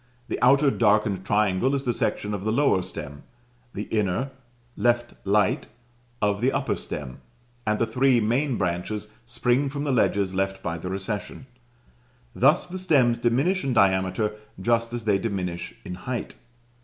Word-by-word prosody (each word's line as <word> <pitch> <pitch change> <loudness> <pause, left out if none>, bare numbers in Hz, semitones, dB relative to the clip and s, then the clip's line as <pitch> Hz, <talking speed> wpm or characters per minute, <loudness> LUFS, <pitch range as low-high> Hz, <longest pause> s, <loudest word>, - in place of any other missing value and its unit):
The - - -3
outer 140 +3 +5
darkened 105 -4 +2
triangle 105 +5 +2
is 135 - -2
the 120 - 0
section 105 -2 -1
of 100 -2 -4
the 110 - 0
lower 135 -6 +3
stem; 75 -6 -7 0.5
the 105 - -3
inner, 110 +5 0 0.4
left 120 0 +1
light, 100 -1 +2 0.6
of 105 0 +1
the 130 +2 +3
upper 135 0 0
stem; 65 -4 -6 0.5
and 105 0 +2
the 115 - +2
three 125 +2 +3
main 120 +4 +1
branches 95 +4 -2 0.2
spring 125 +3 +1
from 140 +1 -4
the 145 - 0
ledges 100 -6 +2
left 95 0 -2
by 85 -1 -3
the 90 - -5
recession. 100 +6 -4 0.9
Thus 135 +5 +4
the 185 +1 -6
stems 135 -10 +3
diminish 135 +12 +1
in 135 - 0
diameter 95 0 +2 0.3
just 115 +3 +1
as 120 -2 -5
they 100 -2 +3
diminish 90 -6 -3
in - - -5
height. 120 +7 -5
110 Hz, 155 wpm, -25 LUFS, 95-130 Hz, 0.9 s, outer